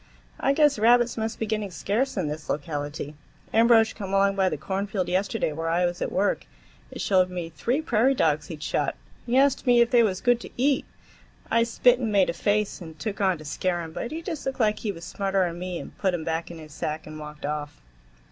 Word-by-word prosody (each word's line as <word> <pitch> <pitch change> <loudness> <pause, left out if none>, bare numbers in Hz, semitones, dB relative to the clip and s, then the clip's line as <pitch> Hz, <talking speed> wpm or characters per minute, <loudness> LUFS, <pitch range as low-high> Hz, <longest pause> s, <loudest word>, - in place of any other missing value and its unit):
I 275 - +2
guess 295 -3 +3
rabbits 240 +2 +4
must 220 0 -3
be 225 - -2
getting 215 -2 -2
scarce 205 - -1
in 180 -5 0
this 150 +1 -6
locality. 145 0 -3 0.4
Ambrosch 225 0 +5
come 195 -2 -6
along 195 0 +3
by 190 -1 +2
the 155 - -3
cornfield 195 +2 -2
yesterday 190 -1 0
where 165 +2 -3
I 175 +2 +2
was 175 0 -3
at - - -1
work 200 +2 0 0.4
and - - -8
showed 185 -2 +3
me 175 -2 -5
three 245 - -1
prairie 260 0 +3
dogs 150 - +1
he'd 155 -3 -7
shot. - - -1 0.3
He 245 +2 +2
asked 275 -1 +3
me 245 -1 +6
if 235 0 +4
they 240 -2 +6
was 195 -5 +1
good 245 -1 +3
to - - -9
eat. 270 +2 +2 0.7
I 230 - +4
spit 240 +1 +3
and 230 -4 -1
made 195 -4 +3
a - - -8
face 205 +2 0
and 160 -2 -9
took 200 +6 -4
on, 190 -3 +2
to 155 - -12
scare 175 +3 -1
him, 160 -1 -9
but 235 - -4
he 325 +2 -6
just 325 -6 -4
looked 270 - -3
like 215 -2 +2
he 215 - -2
was 170 -2 -9
smarter'n 190 -4 -1
me 180 -1 -4
and - - -9
put 190 -3 +1
'em 165 - -4
back 165 +1 -2
in 170 - -8
his 155 -2 -11
sack 155 +1 -4
and 155 0 -9
walked 150 -1 -8
off." 150 0 -4
195 Hz, 230 wpm, -26 LUFS, 165-230 Hz, 0.7 s, me